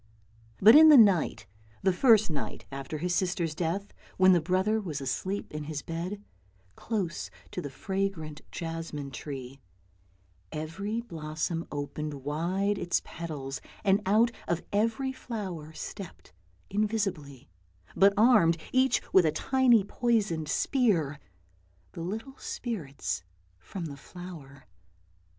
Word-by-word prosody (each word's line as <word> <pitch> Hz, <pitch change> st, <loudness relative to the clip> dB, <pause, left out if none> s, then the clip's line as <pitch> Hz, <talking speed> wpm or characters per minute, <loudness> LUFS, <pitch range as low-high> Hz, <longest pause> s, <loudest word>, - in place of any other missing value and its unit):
But 220 Hz, +6 st, +9 dB
in 315 Hz, +1 st, +10 dB
the 300 Hz, -, +10 dB
night, 195 Hz, -, +4 dB, 0.4 s
the 190 Hz, -1 st, +4 dB
first 220 Hz, -2 st, +5 dB
night 150 Hz, -, -4 dB
after 135 Hz, +3 st, -5 dB
his 175 Hz, +3 st, -1 dB
sister's 175 Hz, -3 st, 0 dB
death, 175 Hz, +5 st, -2 dB, 0.2 s
when 185 Hz, 0 st, +7 dB
the 175 Hz, -, +4 dB
brother 190 Hz, +6 st, +1 dB
was 160 Hz, -8 st, -4 dB
asleep 185 Hz, +10 st, -3 dB
in 150 Hz, -1 st, -4 dB
his 145 Hz, -2 st, -5 dB
bed, 180 Hz, +5 st, -5 dB, 0.5 s
close 195 Hz, -8 st, -3 dB, 0.2 s
to -, -, -4 dB
the 145 Hz, -, -5 dB
fragrant 175 Hz, -1 st, -3 dB
jasmine 165 Hz, -4 st, -5 dB
tree, 135 Hz, -1 st, -7 dB, 0.9 s
every 195 Hz, +9 st, -3 dB
blossom 165 Hz, -4 st, -4 dB
opened 145 Hz, +1 st, -4 dB
wide 175 Hz, +9 st, -1 dB
its 175 Hz, -, 0 dB
petals, 140 Hz, -5 st, -6 dB, 0.2 s
and 200 Hz, 0 st, +3 dB
out 220 Hz, +4 st, +4 dB, 0.2 s
of 170 Hz, 0 st, -1 dB
every 230 Hz, +6 st, +1 dB
flower 190 Hz, -12 st, -6 dB
stepped 170 Hz, -, -9 dB, 0.4 s
invisibly, 195 Hz, -, -2 dB, 0.5 s
but 195 Hz, +1 st, +6 dB
armed 210 Hz, -8 st, +5 dB, 0.2 s
each 260 Hz, +1 st, +3 dB
with 180 Hz, -4 st, +6 dB
a -, -, +3 dB
tiny 245 Hz, -, +3 dB
poisoned 205 Hz, -8 st, 0 dB
spear, 175 Hz, -, +1 dB, 0.7 s
the -, -, -8 dB
little 225 Hz, +10 st, -5 dB
spirits 140 Hz, -, -4 dB, 0.4 s
from 170 Hz, -, -6 dB
the 140 Hz, -3 st, -7 dB
flower. 160 Hz, -4 st, -11 dB
175 Hz, 125 wpm, -29 LUFS, 155-205 Hz, 0.9 s, in